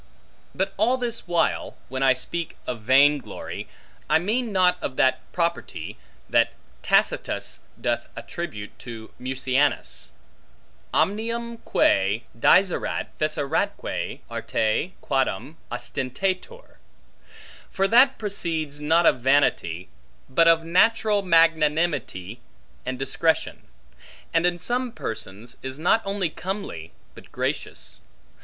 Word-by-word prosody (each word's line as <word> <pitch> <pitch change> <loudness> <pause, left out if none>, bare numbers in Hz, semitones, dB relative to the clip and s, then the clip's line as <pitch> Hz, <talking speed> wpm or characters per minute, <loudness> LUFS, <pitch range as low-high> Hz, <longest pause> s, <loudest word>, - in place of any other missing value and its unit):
But 195 +1 -1
all 235 +6 +3
this 235 -5 -4
while, 175 -1 0
when 130 0 -4
I 135 -1 +6
speak 165 +6 -5
of 120 -3 -4
vain 140 +5 +5
glory, - - -7 0.4
I - - +6
mean 220 +7 -1
not 180 -2 +3
of 130 - -3
that 130 0 +3
property, 170 -1 -2 0.3
that - - +3 0.3
Tacitus - - +1 0.2
doth - - -1
attribute 105 -12 -6
to 115 -2 -9
Mucianus; 130 +2 0 0.8
Omnium 230 +3 0
quae 100 - +2
dixerat 185 +10 +3
feceratque 155 -2 -1
arte 110 +12 -1
quadam 135 +2 -1
ostentator: 185 - -3 0.9
for 195 0 +1
that 260 +5 +6
proceeds 165 -8 -3
not 165 +3 +3
of 125 - +5
vanity, 120 - +2 0.4
but 165 +6 +4
of 165 0 +5
natural 210 +4 +3
magnanimity 160 - +2 0.5
and 130 0 -2
discretion; 135 +5 0 0.7
and 165 +1 +4
in 175 0 0
some 245 +6 -1
persons, 110 - -6
is 130 0 -6
not 180 +8 +3
only 195 -4 -1
comely, 185 - -5 0.2
but - - -15
gracious. - - -3
165 Hz, 110 wpm, -25 LUFS, 130-195 Hz, 0.9 s, I